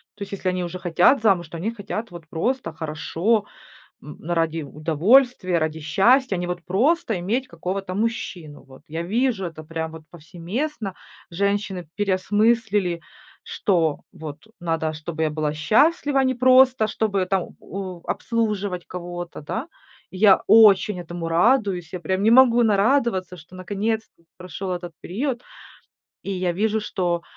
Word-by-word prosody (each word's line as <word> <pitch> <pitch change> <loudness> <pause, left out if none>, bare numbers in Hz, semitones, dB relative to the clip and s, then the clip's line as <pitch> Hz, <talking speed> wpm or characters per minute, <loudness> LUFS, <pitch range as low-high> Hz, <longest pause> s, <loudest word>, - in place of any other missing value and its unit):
То 205 - -6
есть, 200 - -10
если 190 -2 -2
они 180 0 -2
уже 175 +1 -5
хотят 180 +9 +3
замуж, 190 -6 +2
то 165 - -8
они 210 +7 -2
хотят 215 +1 -5
вот 170 -2 -11
просто 235 +5 -2
хорошо, 165 +7 -1 0.6
м, 150 - -11
ради 165 -1 0
удовольствия, 175 - +2
ради 160 0 -2
счастья, 195 - +3
а - - -4
не 175 - -2
вот 175 -1 -4
просто 230 - +1
иметь 235 +9 -2
какого-то 190 -3 -4
мужчину. 195 -8 -3
Вот 135 +1 -17
я 160 +2 -4
вижу 220 +2 0
это 155 -2 -9
прям 160 0 -4
вот 160 0 -11
повсеместно. 195 - -5 0.4
Женщины 200 -1 -1
переосмыслили, 205 -1 +1 0.4
что 165 -7 0
вот 150 -2 -8 0.2
надо, 165 -2 -1
чтобы 160 +1 -5
я 155 - 0
была 150 -1 -1
счастлива, 275 - +2
а - - +2
не 260 0 +1
просто 255 -2 +5
чтобы 200 -3 -1
там 190 -1 -2
о 185 -2 -7
обслуживать 205 -6 -2
кого-то. 175 -1 -7
Да, 225 - -4 0.5
я 195 0 +5
очень 210 -3 +6
этому 175 -1 -6
радуюсь, 180 - +2
я 180 - -4
прям 185 +3 -2
не 220 - +4
могу 240 -1 +6
нарадоваться, 205 -4 +2
что 170 +3 -14
наконец-то 205 +1 -3
прошел 185 +1 -6
этот 175 -1 -4
период. 245 +6 -3 0.8
И 200 - -5
я 180 -2 -1
вижу, 215 +4 0
что 175 -4 -2
185 Hz, 150 wpm, -23 LUFS, 170-220 Hz, 0.8 s, очень